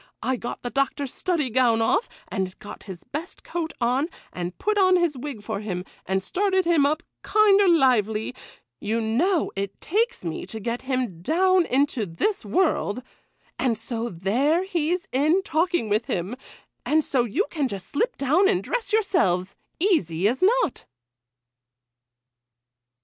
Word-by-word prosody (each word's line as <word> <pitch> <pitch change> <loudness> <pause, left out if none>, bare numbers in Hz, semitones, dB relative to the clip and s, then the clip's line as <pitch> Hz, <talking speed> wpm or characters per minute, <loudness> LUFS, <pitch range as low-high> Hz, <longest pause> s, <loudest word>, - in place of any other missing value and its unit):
I 260 - +1
got 240 0 -6
the 245 - -4
Doctor's 275 0 -1
study 330 -9 -1
gown 235 -2 +3
off, 370 - +1 0.2
and 190 -1 -3
got 205 - -10
his 180 -3 -8
best 320 +6 -7
coat 335 -2 -3
on, 250 +5 +1 0.3
and 175 0 -5
put 425 +1 0
on 370 -1 +5
his 345 -4 +2
wig 255 -4 -6
for 210 -1 -3
him, 185 -4 -4 0.2
and 190 0 0
started 380 - +1
him 325 -5 +4
up 310 +3 -1 0.2
kinder 405 -2 +4
lively,—you 220 - 0
know 290 - +1
it 195 0 -4
takes 450 - -1
me 165 - -4
to 220 - -6
get 235 +3 -3
him 255 -10 -2
down 365 - +3
into 265 -5 +1
this 175 - -1
world,—and 250 - -2
so 230 +1 -4
there 245 - +1
he's 360 0 -1
in 310 +8 +2
talking 340 - 0
with 215 +2 +1
him; 185 +7 -2 0.5
and 310 +1 +2
so 260 -4 +1
you 285 - 0
can 295 -5 0
just 200 -6 -6
slip 475 +12 -1
down 310 +9 +3
and 380 -3 +1
dress - - -2
yourselves,—easy 200 - +1
as 245 +4 0
not. 445 - +2
270 Hz, 145 wpm, -24 LUFS, 215-355 Hz, 0.5 s, on